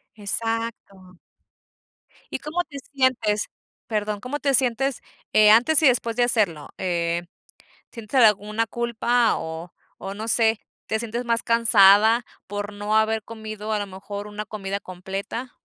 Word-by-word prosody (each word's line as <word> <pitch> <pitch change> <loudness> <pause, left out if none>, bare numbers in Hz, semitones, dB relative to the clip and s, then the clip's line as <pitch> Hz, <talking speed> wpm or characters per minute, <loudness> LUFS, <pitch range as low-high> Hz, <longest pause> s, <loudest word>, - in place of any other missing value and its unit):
Exacto. 205 -3 -3 1.1
¿Y - - -3
cómo 315 +5 -2
te 295 -5 -11 0.2
sientes?, 235 -6 +1 0.4
perdón, 210 -1 -2
¿cómo 265 +5 -4
te 280 -2 +1
sientes, 265 +1 +1 0.3
eh, 215 0 +7
antes 250 +8 +5
y 285 - +7
después 235 -2 +2
de 245 - +2
hacerlo?, 200 -11 0
eh, 170 -1 -1 0.7
¿sientes 230 +3 -2
alguna 215 +1 +3
culpa 235 0 +1
o 160 +2 -7 0.3
o 195 - -5
no 215 +2 -6
sé, 225 -1 +2 0.3
te 220 - 0
sientes 235 +2 -4
más 230 -1 +1
cansada 225 0 +5 0.2
por 205 +1 -5
no 205 +1 -2
haber 220 0 +1
comido 215 -1 -6
a 210 - 0
lo 205 - -3
mejor 200 +2 -8
una 210 0 -6
comida 200 -2 -4
completa? 195 +7 -7
220 Hz, 140 wpm, -23 LUFS, 205-235 Hz, 1.1 s, eh